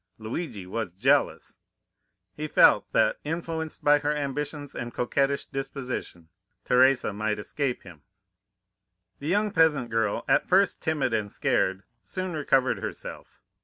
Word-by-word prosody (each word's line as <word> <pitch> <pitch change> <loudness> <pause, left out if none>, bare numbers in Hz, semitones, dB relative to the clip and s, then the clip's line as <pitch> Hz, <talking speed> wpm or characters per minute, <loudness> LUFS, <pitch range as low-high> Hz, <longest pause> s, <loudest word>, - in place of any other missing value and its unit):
"Luigi 110 - -5
was 105 -1 -4
jealous! 135 +8 +1 0.8
"He 155 +1 -4
felt - - +5
that, - - +2
influenced 165 -1 -4
by 145 0 +5
her 150 +1 0
ambitions 145 0 -4
and 120 - -5
coquettish 140 +4 0
disposition, 130 - -6 0.4
Teresa 130 -2 +4
might 105 +1 -1
escape 125 +5 -3
him. 90 -5 -13 1.2
"The 145 - -6
young 205 +4 +1
peasant 150 -9 +2
girl, 115 -2 0
at - - +3
first 195 +2 +3
timid 150 -6 0
and 105 -2 -1
scared, 95 +1 0 0.2
soon 185 - -5
recovered 135 -4 +1
herself. - - -8
135 Hz, 130 wpm, -26 LUFS, 110-150 Hz, 1.2 s, felt